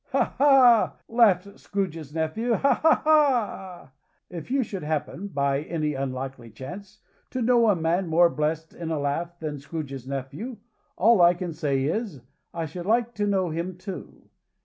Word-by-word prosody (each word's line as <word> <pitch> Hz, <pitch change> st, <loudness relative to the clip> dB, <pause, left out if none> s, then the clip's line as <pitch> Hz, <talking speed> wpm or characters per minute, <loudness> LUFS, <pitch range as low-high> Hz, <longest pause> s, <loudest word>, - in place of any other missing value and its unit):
"Ha! -, -, +1 dB
ha!" 265 Hz, -5 st, +5 dB
laughed 200 Hz, -4 st, +2 dB
Scrooge's 165 Hz, -7 st, -4 dB
nephew. 165 Hz, +10 st, -1 dB
"Ha! 275 Hz, -, +3 dB
ha! 320 Hz, 0 st, +4 dB
ha!" 245 Hz, -, +1 dB, 0.4 s
If 170 Hz, +1 st, -7 dB
you 270 Hz, +1 st, +1 dB
should 200 Hz, -4 st, -6 dB
happen, 155 Hz, +5 st, -3 dB
by 140 Hz, -5 st, 0 dB
any 155 Hz, -1 st, -2 dB
unlikely 135 Hz, -2 st, -5 dB
chance, 190 Hz, -, -10 dB, 0.3 s
to 255 Hz, -, -4 dB
know 235 Hz, -1 st, +4 dB
a 205 Hz, -, +4 dB
man 170 Hz, +3 st, 0 dB
more 170 Hz, +2 st, +5 dB
blessed 155 Hz, +1 st, -2 dB
in 170 Hz, -2 st, -6 dB
a 160 Hz, -, -1 dB
laugh 165 Hz, +5 st, -3 dB
than 150 Hz, -3 st, -5 dB
Scrooge's 140 Hz, -3 st, -6 dB
nephew, 140 Hz, -, -5 dB, 0.4 s
all 220 Hz, 0 st, +5 dB
I 175 Hz, +1 st, +6 dB
can 175 Hz, -1 st, -5 dB
say 145 Hz, -4 st, -1 dB
is, 175 Hz, -, -2 dB, 0.3 s
I 165 Hz, -1 st, -3 dB
should 175 Hz, +4 st, -7 dB
like 235 Hz, +2 st, +1 dB
to 205 Hz, -2 st, -1 dB
know 190 Hz, -4 st, +1 dB
him 170 Hz, +3 st, -4 dB
too. 185 Hz, 0 st, -9 dB
175 Hz, 165 wpm, -25 LUFS, 150-215 Hz, 0.4 s, I